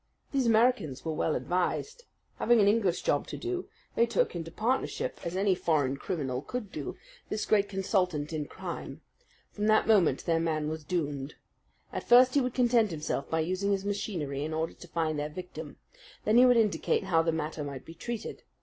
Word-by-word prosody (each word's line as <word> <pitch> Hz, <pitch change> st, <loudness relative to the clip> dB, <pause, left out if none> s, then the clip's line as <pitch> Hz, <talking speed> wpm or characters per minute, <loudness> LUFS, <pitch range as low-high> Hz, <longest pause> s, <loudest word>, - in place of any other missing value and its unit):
These 270 Hz, -4 st, +1 dB
Americans 225 Hz, -, +2 dB
were 160 Hz, -, -1 dB
well 155 Hz, 0 st, 0 dB
advised. 430 Hz, -, -2 dB, 0.3 s
Having 240 Hz, -1 st, +4 dB
an 200 Hz, -, +5 dB
English 205 Hz, -4 st, +2 dB
job -, -, +1 dB
to -, -, -6 dB
do, 365 Hz, +1 st, -4 dB, 0.2 s
they 235 Hz, -, +3 dB
took 235 Hz, -, +1 dB
into 165 Hz, -1 st, -4 dB
partnership, 255 Hz, -, -1 dB
as 170 Hz, +1 st, -4 dB
any 195 Hz, 0 st, +3 dB
foreign 150 Hz, -7 st, +1 dB
criminal 135 Hz, -5 st, -3 dB
could 220 Hz, -, -5 dB
do, -, -, -5 dB, 0.3 s
this 215 Hz, -, -2 dB
great 205 Hz, -2 st, +3 dB
consultant 180 Hz, -6 st, 0 dB
in 150 Hz, -2 st, -3 dB
crime. -, -, -7 dB, 0.5 s
From 210 Hz, 0 st, -2 dB
that 215 Hz, 0 st, +4 dB
moment 185 Hz, -, +3 dB
their 165 Hz, -1 st, +2 dB
man 155 Hz, -2 st, 0 dB
was 155 Hz, 0 st, -5 dB
doomed. 145 Hz, -5 st, -3 dB, 0.6 s
At -, -, -5 dB
first 250 Hz, +1 st, +7 dB
he 285 Hz, -, +4 dB
would 250 Hz, -1 st, -2 dB
content 240 Hz, -3 st, +3 dB
himself 155 Hz, -4 st, -3 dB
by 160 Hz, 0 st, +1 dB
using 185 Hz, +5 st, -1 dB
his 195 Hz, 0 st, 0 dB
machinery 170 Hz, -9 st, -2 dB
in 155 Hz, +1 st, -3 dB
order 160 Hz, +1 st, -2 dB
to 175 Hz, -, -13 dB
find 160 Hz, -2 st, -1 dB
their 150 Hz, +1 st, -2 dB
victim. 160 Hz, -2 st, -8 dB, 0.5 s
Then 215 Hz, +2 st, +4 dB
he 250 Hz, +1 st, +8 dB
would 245 Hz, -1 st, +5 dB
indicate 215 Hz, -3 st, +2 dB
how 175 Hz, -4 st, +3 dB
the 165 Hz, 0 st, +1 dB
matter 155 Hz, -1 st, -3 dB
might 140 Hz, -2 st, -7 dB
be 165 Hz, -, -10 dB
treated. 230 Hz, +6 st, -6 dB
180 Hz, 190 wpm, -29 LUFS, 155-220 Hz, 0.6 s, he